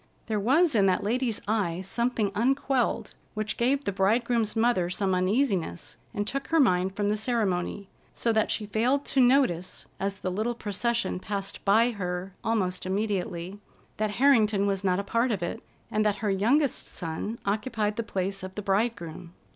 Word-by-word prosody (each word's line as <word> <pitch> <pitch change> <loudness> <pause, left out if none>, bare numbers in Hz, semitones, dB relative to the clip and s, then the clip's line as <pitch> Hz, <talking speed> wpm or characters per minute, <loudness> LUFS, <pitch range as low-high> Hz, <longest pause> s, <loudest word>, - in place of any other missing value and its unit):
There 215 -2 -1
was 290 - +3
in 200 -4 +4
that 185 -1 +1
lady's 235 +1 0
eye 190 -5 0
something 225 +1 -1
unquelled 260 +3 0 0.2
which 215 0 -2
gave 270 +4 +1
the 200 - -1
bridegroom's 220 +3 +1
mother 225 -6 +2
some 190 +1 0
uneasiness 185 - 0 0.2
and 205 - -2
took 275 +2 -3
her 325 - +2
mind 190 -7 +3
from 205 0 0
the 210 - +2
ceremony, 205 -4 -1 0.3
so 230 - 0
that 220 -1 +2
she 215 - -1
failed 240 +7 +1
to 270 - +2
notice 245 -9 +2
as 195 0 -2
the 185 -1 -3
little 220 +6 -1
procession 230 -1 -1
passed 195 0 -5
by 225 +4 +4
her 180 -2 -4
almost 185 -5 -1
immediately, 195 -2 -2 0.4
that 215 0 0
Harrington 220 -7 +4
was 195 -1 -1
not 185 -2 +2
a - - -2
part 230 +5 +1
of 195 -5 -1
it, 170 - -4 0.3
and 215 - +2
that 210 -1 +2
her 205 - +2
youngest 245 +8 +1
son 175 +6 -5
occupied 210 0 -1
the 230 - -1
place 195 -2 -3
of 185 0 -8
the 210 - -4
bridegroom. 195 -5 -2
210 Hz, 170 wpm, -27 LUFS, 190-235 Hz, 0.4 s, in